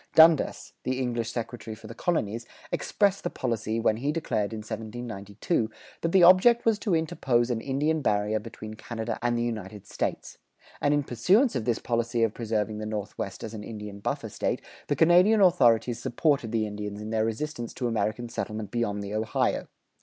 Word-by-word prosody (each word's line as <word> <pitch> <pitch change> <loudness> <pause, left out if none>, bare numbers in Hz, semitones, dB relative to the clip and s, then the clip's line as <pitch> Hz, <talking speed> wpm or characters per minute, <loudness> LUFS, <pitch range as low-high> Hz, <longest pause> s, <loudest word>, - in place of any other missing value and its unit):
Dundas, 160 -2 +5
the 130 0 -2
English 120 -3 -1
secretary 115 -1 -5
for 110 - -15
the 110 - -7
colonies, 115 - -1 0.2
expressed 200 -2 +1
the 175 - -1
policy, 115 -5 -2
when 110 -1 +2
he 140 +5 0
declared, 115 -10 -1
in 110 -1 -5
1792, 110 - -3 0.3
that 165 - 0
the 185 -1 +6
object 185 +7 +7
was 225 -2 +3
to 195 -6 +1
interpose 125 -6 +1
an 115 -2 -1
Indian 150 +5 0
barrier 105 -2 +1
between 110 0 -9
Canada 110 +1 -5
and 120 0 +1
the 120 - 0
United 105 -3 -5
States; - - -4 0.4
and 145 - +3
in 145 - +1
pursuance 190 - +3
of 115 - -1
this 120 -2 +1
policy 115 0 0
of 110 -2 +2
preserving 110 -2 -2
the 110 - -4
Northwest 105 -2 -5
as 110 - -6
an 105 -1 -6
Indian 105 -2 -7
buffer - - -3
State, - - -2 0.2
the - - +1
Canadian 180 +6 +5
authorities 120 - +4
supported 130 -2 +1
the 110 -2 +1
Indians 105 0 -5
in 105 +1 -6
their 110 -1 +2
resistance 120 +2 -3
to 125 - -4
American 115 +1 -1
settlement 110 -3 -4
beyond 105 -4 -1
the 100 +1 -5
Ohio. 110 +1 0
115 Hz, 180 wpm, -27 LUFS, 110-140 Hz, 0.4 s, object